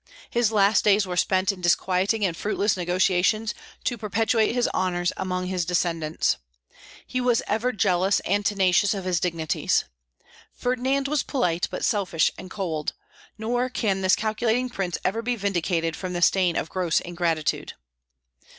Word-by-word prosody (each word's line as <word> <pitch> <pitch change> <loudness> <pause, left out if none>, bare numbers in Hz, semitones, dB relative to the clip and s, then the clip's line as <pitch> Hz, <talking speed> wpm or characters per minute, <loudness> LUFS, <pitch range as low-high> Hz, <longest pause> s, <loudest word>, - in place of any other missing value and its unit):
His 235 -2 +2
last 205 0 +4
days 205 -1 +4
were 180 -1 -4
spent 185 +1 +2
in 190 -2 -10
disquieting 190 +4 +2
and 175 -3 -1
fruitless 205 +2 0
negotiations 185 +4 +1 0.3
to 240 -3 -2
perpetuate 220 +2 +1
his 245 0 +1
honors 175 -1 0
among 185 -1 -2
his 180 -1 -1
descendants. 165 -2 0 0.7
He 255 - -2
was 245 -2 +2
ever 225 +4 0
jealous 195 -2 +2
and 205 +2 0
tenacious 200 0 +2
of 195 -2 -5
his 180 -2 +1
dignities. 165 -3 0 0.7
Ferdinand 260 +2 0
was 295 -1 +1
polite, 180 - 0
but - - -3
selfish 190 -7 +1
and 185 - -10
cold; 165 -7 -3 0.4
nor 245 +3 -1
can 200 -6 -1
this 185 0 +4
calculating 225 +3 0
prince 185 -6 -2
ever 220 +5 0
be 245 +1 -1
vindicated 175 -5 -1
from 185 -1 -5
the 175 0 0
stain 180 -2 +3
of - - -1
gross 180 -3 +1
ingratitude. 170 -3 -2
190 Hz, 150 wpm, -25 LUFS, 180-220 Hz, 0.7 s, last